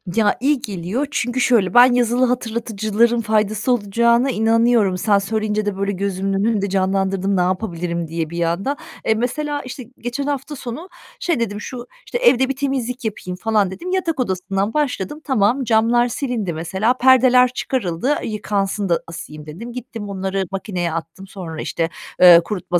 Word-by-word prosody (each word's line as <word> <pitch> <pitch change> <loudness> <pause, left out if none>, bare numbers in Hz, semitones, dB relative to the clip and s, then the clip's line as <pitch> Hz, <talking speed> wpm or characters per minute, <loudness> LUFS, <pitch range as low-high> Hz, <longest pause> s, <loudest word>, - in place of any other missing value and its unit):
Ya, 215 -2 +3
iyi 275 +1 +1
geliyor 200 +8 -3
çünkü, 245 0 -1
şöyle, 230 -7 +3
ben 245 +1 +7
yazılı 245 +1 +2
hatırlatıcıların 230 -1 0
faydası 215 +1 0
olacağına 235 +3 +2
inanıyorum. 225 -3 +3
Sen 205 +1 +3
söyleyince 215 +1 -1
de, 205 -2 -2
böyle, 200 +1 -1
gözümün 195 0 -2
önünde 200 0 0
canlandırdım 190 0 0
ne - - +3
yapabilirim 175 -2 -2
diye 165 0 -3
bir 170 +1 -4
anda. 190 +12 -1 0.3
E, 220 - +3
mesela, 290 +6 -2
işte, 255 +1 -7 0.2
geçen 245 +4 -3
hafta 285 +1 -3
sonu 275 +8 -7 0.3
şey 340 -7 0
dedim, 205 -3 -2
"Şu, 245 -1 -7 0.2
işte, - - -3
evde 270 - +4
bir 270 - -1
temizlik 260 -2 -3
yapayım." 180 -4 -4
falan 210 -3 +1
dedim. 355 - -6
Yatak 360 -5 -1
odasından 195 -1 -1
başladım. 295 -2 -2
Tamam, 255 -1 +2
camlar 235 +1 +3
silindi 235 - -3
mesela. 190 +9 0
Perdeler 255 0 +6
çıkarıldı, 250 - -1
"Yıkansın 205 -2 -2
da 170 - +2
asayım." 160 -3 -9
dedim. 210 +11 -8
Gittim 225 -4 -7
onları 190 0 -2
makineye 185 -3 -3
attım. 165 +4 -6
Sonra, 170 -5 -7
işte, 165 -1 -2 0.3
eee, 175 -2 +9
kurutma 180 -3 -1
220 Hz, 160 wpm, -20 LUFS, 190-245 Hz, 0.3 s, eee